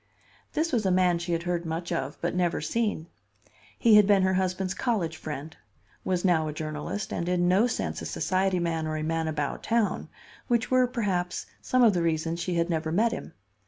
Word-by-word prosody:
This 325 +2 0
was 230 -3 +2
a 190 - +2
man 180 -2 +3
she 175 +1 -4
had 170 0 0
heard 175 -1 -1
much 165 +1 -4
of 135 +2 -2
but 170 - -1
never 180 -1 +1
seen. 210 0 -1 0.7
He 225 -3 +6
had 210 -2 +6
been 200 -2 +5
her 190 0 +2
husband's 185 0 0
college 195 -10 -1
friend; 155 +1 -7 0.5
was 185 0 -1
now 160 -4 +3
a 150 - -4
journalist, 155 +6 -4
and 170 - -2
in 175 -1 +2
no 195 +6 +4
sense 80 - -3
a 80 - -4
society 185 - 0
man 165 -2 -1
or 155 0 -2
"a 155 - -3
man 165 0 -1
about 150 -2 -2
town," 225 -4 0 0.4
which 240 -1 +1
were, 255 -1 +4
perhaps, 190 -7 -2 0.2
some 255 -1 +2
of 225 -3 +6
the 175 - 0
reasons 165 0 0
she 175 0 -2
had 170 0 +1
never 160 -2 -1
met 220 +7 +2
him. 235 - -6
175 Hz, 205 wpm, -27 LUFS, 160-200 Hz, 0.7 s, He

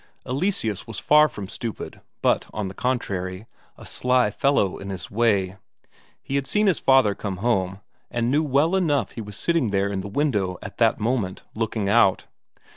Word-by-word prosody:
Eleseus 130 - -1
was 115 - -7
far 150 +1 +5
from 100 -2 -7
stupid, 115 +3 -6 0.2
but - - +2
on 105 -3 -3
the - - -9
contrary, 95 -6 -2 0.3
a - - -12
sly 125 -3 +1
fellow 120 -5 +1
in 95 - -7
his 95 -2 -6
way. 100 -4 +1 0.7
He - - -6
had 140 -1 -2
seen 210 0 +2
his 190 -5 +2
father 130 -6 +4
come 100 -1 -5
home, 95 -3 0 0.3
and 120 +1 -1
knew 150 +3 +3
well 150 +4 +2
enough 145 - +1
he 115 - -7
was 105 -2 -8
sitting 165 - +1
there 100 0 0
in 95 -1 -2
the 95 - -6
window 100 -7 0
at 100 - -9
that 115 -1 +3
moment, 110 -4 -1
looking 110 -2 -2
out. 100 -3 +4
115 Hz, 180 wpm, -24 LUFS, 100-135 Hz, 0.7 s, far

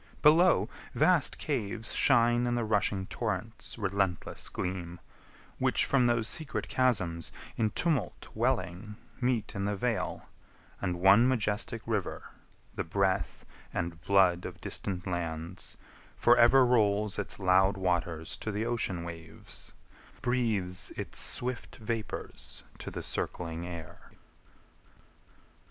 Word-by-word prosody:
Below, 165 +4 +6 0.3
vast 175 -6 +4
caves 115 -6 -2
Shine 120 -2 +4
in 120 - +1
the 120 - 0
rushing 100 -2 +1
torrents' 110 +2 -3
restless 95 -3 -1
gleam, 90 -1 -4 0.6
Which - - +3
from 130 -3 +3
those 115 -2 +2
secret 155 +4 -1
chasms 95 -11 +1 0.2
in 110 -1 +1
tumult 150 0 -1
welling 95 +5 -1 0.3
Meet 125 -3 0
in 100 0 -2
the 105 0 0
vale, 115 +3 -2 0.6
and 90 -3 -1
one 100 +6 +7
majestic 115 -2 0
River, 105 -5 -3 0.4
The - - -2
breath 95 +3 0 0.3
and 85 -1 -3
blood 90 -2 +4
of - - -7
distant 95 -2 -2
lands, 85 -1 -4 0.4
for 120 - +6
ever 125 +2 +6
Rolls 105 -4 +2
its 105 - -4
loud 95 +1 +4
waters 85 -3 -1
to 110 - -3
the 105 +2 -2
ocean 115 -7 -1
waves, 85 -1 -8 0.5
Breathes 110 -8 0
its - - -5
swift 125 0 -4
vapours 110 0 -5 0.2
to - - -5
the - - -6
circling 85 0 -3
air. 85 -2 -9
105 Hz, 120 wpm, -30 LUFS, 90-120 Hz, 0.6 s, one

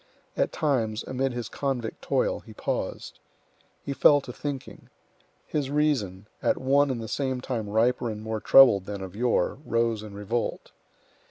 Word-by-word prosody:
At - - +1
times, 115 -7 0
amid 130 +1 -1
his 120 -2 -4
convict 125 -4 -3
toil, - - 0
he - - -14
paused. - - -4 0.7
He 140 - -2
fell 145 +1 +6
to 125 - -9
thinking. 140 -1 -6 0.6
His 145 -3 -2
reason, 135 -11 0 0.2
at - - +2
one 140 +2 +3
and 130 -3 -2
the - - -6
same 130 +1 -2
time 115 -5 -4
riper 120 +3 +1
and 105 -1 -5
more 110 0 -3
troubled 105 -8 +7
than 100 -1 -5
of 95 0 -8
yore, 120 0 +1
rose 115 -4 0
in 105 -2 -9
revolt. 110 +4 -3
120 Hz, 160 wpm, -26 LUFS, 110-135 Hz, 0.7 s, troubled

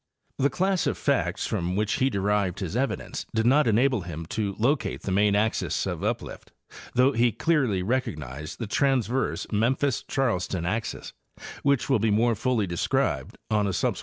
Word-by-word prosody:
The 140 +1 +3
class 185 +5 0
of - - -1
facts - - 0
from 90 +2 -2
which 105 +1 0
he 130 - +3
derived 100 -3 0
his 95 0 -4
evidence 135 +3 -2
did 110 0 +2
not 140 +3 +4
enable 120 +1 +3
him 85 -2 -6
to 100 -3 -2
locate 135 +6 0
the 95 - -3
main 100 +1 +3
axes 110 +2 0
of - - -4
uplift, - - -4 0.4
though 125 +2 +5
he 120 -1 +2
clearly 130 - +1
recognized 75 - -3
the 115 - -4
transverse 130 +1 0
Memphis 125 +5 +1
Charleston 95 - -1
axis, 110 +5 -3 0.5
which 140 -2 +2
will 135 -4 +3
be 110 +1 +1
more 115 +3 +3
fully 115 0 0
described 85 -2 -1
on 105 -1 +2
a 95 - -1
subsequent - - 0
page. - - -6
110 Hz, 170 wpm, -26 LUFS, 100-130 Hz, 0.5 s, though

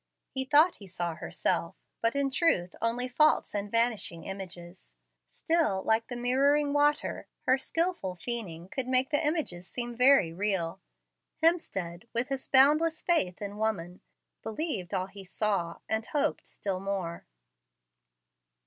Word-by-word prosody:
He 265 0 -2
thought 305 +6 +5
he 200 - -12
saw 175 -2 -2
herself, - - -1 0.3
but 230 +3 +1
in 280 -1 +1
truth 225 - +1
only 235 +2 0
false 305 +5 +3
and 205 0 -2
vanishing 225 -7 0
images. 175 - -9 0.3
Still, 215 - +1
like 225 +1 +1
the 245 - -6
mirroring 280 +4 +2
water, 295 +1 +1 0.2
her 260 +1 +4
skilful 330 - -1
feigning 180 -5 -5
could 255 +5 -4
make 255 +2 +2
the 290 +1 +2
images 295 - -2
seem 240 -1 -4
very 250 -9 +5
real. 190 -3 -1 0.6
Hemstead, 195 - 0
with 240 +3 0
his 270 -1 -3
boundless 305 +4 +4
faith 205 - +1
in 205 +1 -6
woman, 185 -5 -2 0.4
believed 220 - -3
all 185 - 0
he 195 +1 -10
saw, 190 -3 -1
and 220 0 -1
hoped 290 +5 -1
still 195 -2 -3
more. 190 -3 -4
225 Hz, 140 wpm, -29 LUFS, 185-280 Hz, 0.6 s, thought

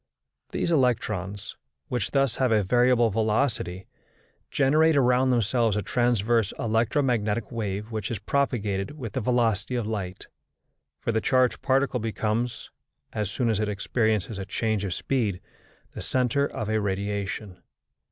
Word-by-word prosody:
These 170 - -1
electrons, 105 - 0 0.3
which 125 -6 -2
thus 135 -3 +1
have 130 -3 +2
a 105 -2 +4
variable 120 +2 +3
velocity, 110 -4 0 0.6
generate 155 +3 +3
around 125 0 +4
themselves 115 -2 +2
a 105 - -1
transverse 120 -3 +1
electromagnetic 115 -1 0
wave 105 -1 -3
which 110 -3 -3
is 115 - -2
propagated 105 0 -1
with 115 -8 -6
the 130 - -1
velocity 115 -1 +1
of 120 -3 -1
light; 100 -4 -4 0.7
for - - -1
the 110 -1 0
charged 130 0 +2
particle 135 -1 +1
becomes, 115 +1 -2 0.4
as 105 -3 -2
soon 120 +3 -1
as 110 -3 +1
it 105 -1 0
experiences 110 0 0
a 95 - -4
change 110 0 -1
of 90 - -2
speed, 110 -9 -1 0.5
the - - -6
centre 130 +2 +1
of 110 - -5
a 110 0 +1
radiation. 100 0 -3
115 Hz, 140 wpm, -26 LUFS, 105-125 Hz, 0.7 s, a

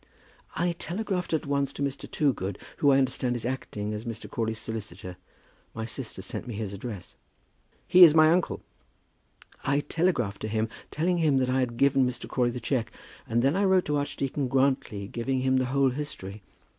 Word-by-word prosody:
"I 175 +1 +1
telegraphed 180 +2 -3
at 160 - 0
once 140 -1 0
to 140 - -3
Mr. 140 -1 -3
Toogood, 100 - 0 0.2
who 145 - +4
I 135 - +5
understand 130 -2 +1
is 120 - -4
acting 105 -5 -3
as 105 +1 -5
Mr. 115 -2 -6
Crawley's 110 -1 -2
solicitor. 105 -5 -6 0.6
My 110 0 -3
sister 115 -5 -5
sent 100 - -5
me 120 - -5
his 105 -2 -4
address." 100 -2 -7 0.7
"He 180 0 +8
is 160 -3 +9
my 155 0 +7
uncle." 175 +1 0 1.0
"I 140 +1 +2
telegraphed 145 - 0
to - - -2
him, 110 +1 -1 0.2
telling 175 +3 0
him 150 -4 +3
that 130 -1 +1
I 130 - +2
had 120 -2 -1
given 135 -1 +4
Mr. 120 0 -6
Crawley 125 -2 +1
the 120 +1 -4
cheque, 120 -1 -1 0.4
and 120 +1 +1
then 140 +5 +3
I 200 - +2
wrote 190 -2 +4
to 150 0 0
Archdeacon 140 -1 -2
Grantly 130 -6 +1
giving 130 +4 -2
him 130 0 +2
the 130 - +2
whole 135 +1 +2
history. 115 -8 -6
130 Hz, 185 wpm, -27 LUFS, 115-145 Hz, 1.0 s, is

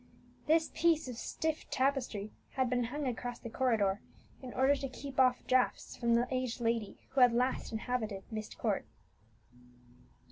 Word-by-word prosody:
This 320 +1 +3
piece 325 -4 +3
of 250 - -5
stiff 315 +6 -3
tapestry 255 -6 0 0.2
had 260 -2 +1
been 245 -1 +2
hung 285 +5 -3
across 245 -1 -3
the 235 - -8
corridor 220 -6 +2 0.4
in 255 -2 -7
order 270 +2 +4
to 275 -1 -4
keep 270 +1 -6
off 255 -1 +4
draughts 255 -1 +1
from 235 -1 +2
the 240 +1 +2
aged 255 -1 -1
lady 230 -3 -1
who 265 - +1
had 245 -1 +7
last 250 +2 0
inhabited 220 -3 -2
Myst 215 -1 -5
Court. - - -1
250 Hz, 155 wpm, -33 LUFS, 230-265 Hz, 0.4 s, had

